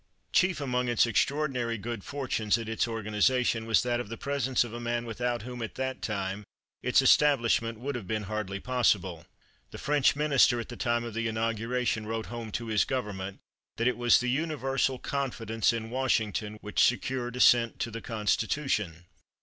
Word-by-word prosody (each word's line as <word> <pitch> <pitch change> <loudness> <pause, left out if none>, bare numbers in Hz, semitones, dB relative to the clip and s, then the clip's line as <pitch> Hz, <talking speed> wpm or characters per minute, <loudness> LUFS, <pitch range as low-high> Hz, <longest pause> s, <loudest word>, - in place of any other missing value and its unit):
Chief 185 -4 +3
among 125 -3 -1
its 120 -1 +4
extraordinary 125 0 0
good 110 -1 -5
fortunes 120 -6 -1
at 115 -2 -6
its 110 +1 0
organization 115 +1 +1
was 115 - +3
that 120 -1 0
of 120 - -5
the 115 - -6
presence 135 -3 0
of 120 -2 -8
a 120 - -5
man 120 0 -2
without 120 0 -2
whom 125 0 -7
at 115 - -5
that 130 0 -3
time 100 -1 -3 0.4
its 125 +2 +3
establishment 115 -5 +3
would 140 +4 -3
have 120 -7 -6
been 110 +1 -2
hardly 100 -1 -4
possible. 100 -9 0 0.4
The - - -9
French 145 -2 +2
Minister 140 -5 +4
at 115 - -6
the 120 - -7
time 120 -1 0
of 115 -2 -6
the 115 +1 -1
inauguration 115 +1 -1
wrote 115 0 -3
home 115 -2 -6
to 120 - -3
his 110 -2 +2
government 100 -7 -4 0.4
that 115 - +1
it 125 - +2
was 120 -1 +4
the 125 - -1
universal 135 -3 0
confidence 115 -5 -1
in 115 -1 -4
Washington 110 -4 0
which 105 -1 +1
secured 125 0 0
assent 120 -2 +4
to 115 - -2
the 115 +1 -6
Constitution. 105 - -1
120 Hz, 175 wpm, -29 LUFS, 110-125 Hz, 0.4 s, its